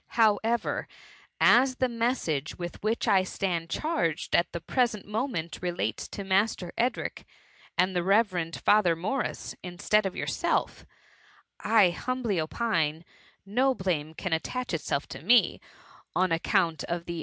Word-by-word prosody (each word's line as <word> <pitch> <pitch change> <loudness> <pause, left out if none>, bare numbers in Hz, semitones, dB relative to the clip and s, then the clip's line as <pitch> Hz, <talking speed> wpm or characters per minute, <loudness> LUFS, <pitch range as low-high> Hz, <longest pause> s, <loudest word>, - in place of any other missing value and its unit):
However, 225 +1 +2 0.5
as 255 +1 +5
the 255 - +1
message 230 - -1
with 175 -1 -6
which 220 +2 -1
I 190 - +5
stand 180 -3 -2
charged 300 - -1
at 170 - +2
the 170 - -4
present 235 +2 0
moment, 210 - -3
rdates 175 -1 -2
to 200 - -6
Master 195 -2 0
Edric 245 +2 -1 0.5
and 185 +1 +2
the 175 - +2
revered 185 -4 +1
Father 200 -5 +3
Morris, 215 +11 -3
instead 195 +3 +1
of 190 - -6
yourself, - - -1 0.7
I 210 -4 +4
humbly 235 -3 -1
opine, 160 -3 -1 0.4
no 255 +6 +2
blame 160 -6 -2
can 185 0 -3
attach 245 +8 -2
itself 145 -3 -1
to - - -8
me, 235 +9 +4 0.5
on 185 -1 +2
account 165 0 +1
of 170 0 -3
the 170 - -4
THB - - -5
MVMMT. - - -4
190 Hz, 145 wpm, -28 LUFS, 170-230 Hz, 0.7 s, as